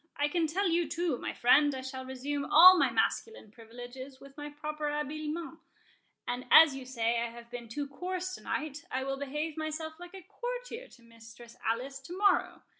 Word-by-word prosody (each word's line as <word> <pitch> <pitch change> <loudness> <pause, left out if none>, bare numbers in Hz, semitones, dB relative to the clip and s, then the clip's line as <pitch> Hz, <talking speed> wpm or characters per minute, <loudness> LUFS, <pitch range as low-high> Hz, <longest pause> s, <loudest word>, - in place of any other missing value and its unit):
I 290 +1 +1
can 330 0 +1
tell 380 +6 0
you 340 -2 +1
too, 330 -5 -1
my - - -3
friend, 290 +3 +4
I 260 - -5
shall 260 0 -7
resume 280 +2 -3
all 365 +4 +9
my 360 - +3
masculine 445 - -1
privileges 245 +4 -10
with 275 0 -14
my 295 0 -7
proper 300 0 -4
habiliments; 310 +3 -4 0.7
and 245 +1 -3
as 315 -4 +8
you 265 -1 -7
say 235 -2 0
I 235 - -2
have 235 0 -13
been 240 -2 -7
too 285 +5 -4
coarse 365 +5 -4
to - - -8
night, 305 -1 -4
I 260 +1 -2
will 270 0 -3
behave 295 +3 -4
myself 315 +1 -4
like 355 +2 -10
a 380 - -10
courtier - - -6
to 240 - -19
Mistress 230 0 -14
Alice 255 +5 -2
to 335 +7 -9
morrow. 395 -3 +2
290 Hz, 190 wpm, -30 LUFS, 255-330 Hz, 0.7 s, all